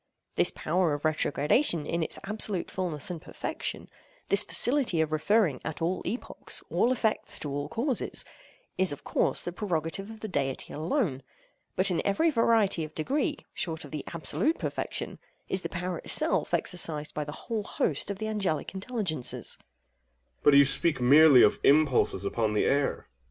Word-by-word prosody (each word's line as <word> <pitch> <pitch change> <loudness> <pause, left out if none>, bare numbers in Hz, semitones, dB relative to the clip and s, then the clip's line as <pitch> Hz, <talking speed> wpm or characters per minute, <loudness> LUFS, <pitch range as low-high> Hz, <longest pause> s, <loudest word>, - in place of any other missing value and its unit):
This - - +3
power 170 -1 0
of 145 - -7
retrogradation 155 - +1
in 170 +2 -2
its 160 - -2
absolute 205 -2 -1
fulness 175 -4 -3
and 170 -3 -6
perfection—this 355 - -3
faculty 245 - +2
of 160 -1 +1
referring 155 - +1
at 160 - -5
all 175 +3 -1
epochs, 240 - -4
all 245 - +2
effects 225 -4 0
to 145 - -4
all 145 +1 -3
causes—is 235 - -1
of 145 - -7
course - - +1
the 175 - -3
prerogative 180 0 -3
of 220 -1 -11
the 220 - -4
Deity 140 -8 -2
alone—but 170 - -2
in 175 - 0
every 320 +12 +2
variety 225 - +2
of 155 - -9
degree, 285 - -1 0.2
short 160 -4 -3
of 145 - -13
the 150 -3 -5
absolute 280 - +1
perfection, - - -4 0.3
is 190 - -1
the - - -5
power 180 -1 -4
itself - - +2
exercised 155 -4 0
by 150 - -2
the 150 - -7
whole 225 -2 -2
host 150 -5 -1
of 200 - -3
the 215 - -4
Angelic 195 -8 -2
intelligences. 190 - -3
OINOS. - - -40
But 145 - +5
you 140 0 +8
speak 150 +3 0
merely 140 +1 +7
of - - +3
impulses 140 -9 +3
upon 110 +1 -1
the - - +2
air. 140 0 +2
AGATHOS. - - -27
170 Hz, 160 wpm, -28 LUFS, 150-210 Hz, 0.3 s, you